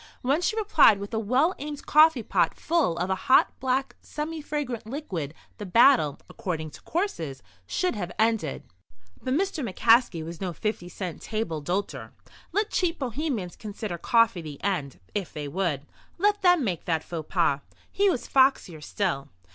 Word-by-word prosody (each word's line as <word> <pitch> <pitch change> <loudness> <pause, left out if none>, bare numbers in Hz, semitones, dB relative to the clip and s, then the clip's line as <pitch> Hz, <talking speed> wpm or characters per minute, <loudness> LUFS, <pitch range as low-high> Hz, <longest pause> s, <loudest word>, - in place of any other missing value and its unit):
When 280 +6 +2
she 395 - 0
replied 325 - +5
with 200 +3 -7
a 220 - +1
well 255 - +2
aimed 290 0 -6
coffee 305 -5 +5
pot - - +1
full 320 - +1
of 180 +2 -1
a 190 - -4
hot, 260 - +6
black, 260 +1 -1
semi 310 +1 -5
fragrant 285 -7 -4
liquid 185 - -5 0.2
the 210 - -5
battle, 230 - +5
according 160 -4 -4
to - - -13
courses, 165 - -3 0.2
should 365 - 0
have 180 -5 -4
ended. 220 -9 0 0.6
But 260 +1 -1
Mr. 370 -3 -1
McCaskey 225 -5 +3
was 170 +1 -8
no 180 -2 -2
50 180 -1 -3
cent 180 -1 -6
table 215 -8 -3
d'hôter. 185 +7 -3 0.4
Let 415 +4 0
cheap 350 -2 0
Bohemians 255 - -3
consider 205 -4 -6
coffee 230 -6 +3
the 150 -3 -9
end, 150 - -2
if 200 -4 -3
they 150 -2 -5
would. 150 -3 -2 0.3
Let 410 +3 +2
them 355 -5 +5
make 180 -8 -2
that 160 -2 0
faux 160 -3 -7
pas. 165 -6 +2 0.3
He 400 0 +3
was 260 - -2
foxier 260 - +3
still. 145 -7 -2
215 Hz, 165 wpm, -26 LUFS, -, 0.6 s, hot